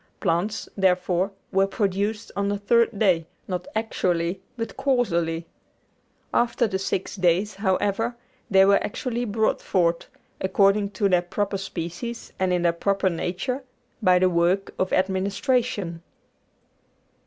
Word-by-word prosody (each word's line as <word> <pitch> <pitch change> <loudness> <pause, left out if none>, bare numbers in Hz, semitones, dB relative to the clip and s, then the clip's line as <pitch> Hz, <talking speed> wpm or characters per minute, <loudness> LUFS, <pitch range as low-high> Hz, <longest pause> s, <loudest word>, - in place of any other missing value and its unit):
Plants, 185 +4 -1
therefore, 185 -1 +2 0.2
were 195 +1 +3
produced 205 +2 -1
on 200 0 0
the 205 - 0
third 230 +2 +2
day, 180 -6 +2 0.2
not 180 -1 -3
actually, 185 -5 0 0.2
but 230 -1 -4
causally. 170 -11 0 0.9
After 240 0 +2
the 190 -3 -1
six 190 0 -2
days, 185 +2 +2
however, 205 +4 0 0.3
they 190 -1 +6
were 200 0 +4
actually 240 +3 -3
brought 220 0 0
forth, 170 -2 +1 0.3
according 195 +2 +3
to 205 - +3
their 180 -2 +3
proper 195 +2 -2
species 195 +5 -6
and 185 -1 +1
in 180 -1 +1
their 170 -1 +3
proper 195 +2 +1
nature, 185 +10 -2 0.4
by 185 -3 +5
the 185 +1 +4
work 175 +3 +1
of 185 - 0
administration. 195 0 0
195 Hz, 130 wpm, -24 LUFS, 180-210 Hz, 0.9 s, they